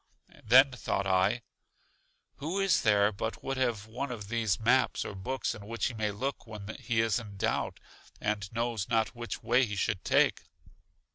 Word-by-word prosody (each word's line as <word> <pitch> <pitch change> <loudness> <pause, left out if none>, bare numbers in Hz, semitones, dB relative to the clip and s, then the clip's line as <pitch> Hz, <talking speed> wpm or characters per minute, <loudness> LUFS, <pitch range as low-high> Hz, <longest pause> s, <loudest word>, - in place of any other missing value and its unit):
Then 130 +4 +7
thought 100 -5 -2
I: 100 +5 +2 0.9
Who 165 +7 -2
is 195 -1 +3
there 105 -3 +4
but 110 +2 -4
would 135 0 -2
have 120 -5 0
one 125 +6 -4
of 105 -4 -7
these 115 -4 0
maps 125 +4 +2
or - - -5
books 125 +8 -2
in 100 -1 -10
which 115 +1 -2
he - - -7
may 110 -2 -1
look 125 +6 -4
when 105 -1 -7
he 115 -2 +1
is 115 +1 +1
in 105 -4 -10
doubt, 110 +3 -1 0.4
and 105 -2 -2
knows 115 -3 -2
not 110 -1 +1
which 120 -1 -6
way 120 +3 +4
he 105 -4 -2
should 95 -1 -1
take? - - +3
110 Hz, 180 wpm, -30 LUFS, 105-125 Hz, 0.9 s, Then